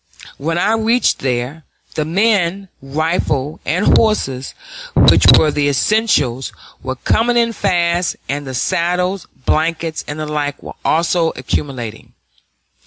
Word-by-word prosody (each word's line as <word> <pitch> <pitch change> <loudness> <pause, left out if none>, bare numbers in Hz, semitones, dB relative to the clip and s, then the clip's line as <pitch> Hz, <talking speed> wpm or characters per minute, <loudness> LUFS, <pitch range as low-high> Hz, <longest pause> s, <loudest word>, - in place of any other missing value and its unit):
When 165 +4 -1
I 210 +5 +2
reached 225 +2 +2
there, 130 +4 -3 0.3
the 155 - -2
men, 195 +1 +1
rifles, 150 0 -1
and 175 +8 +3
horses, 135 - -1 0.4
which - - +5
were 155 - +3
the 145 0 +1
essentials, 140 - +1 0.3
were 130 0 -4
coming 235 - +1
in 230 -1 +2
fast, 175 -4 0
and 145 0 -3
the 130 - -5
saddles, 180 +7 -1 0.2
blankets, 160 0 0
and 145 - -5
the 155 - -3
like 150 -1 -3
were - - -8
also 165 +1 +2
accumulating. 130 -4 -4
160 Hz, 125 wpm, -17 LUFS, 140-190 Hz, 0.4 s, which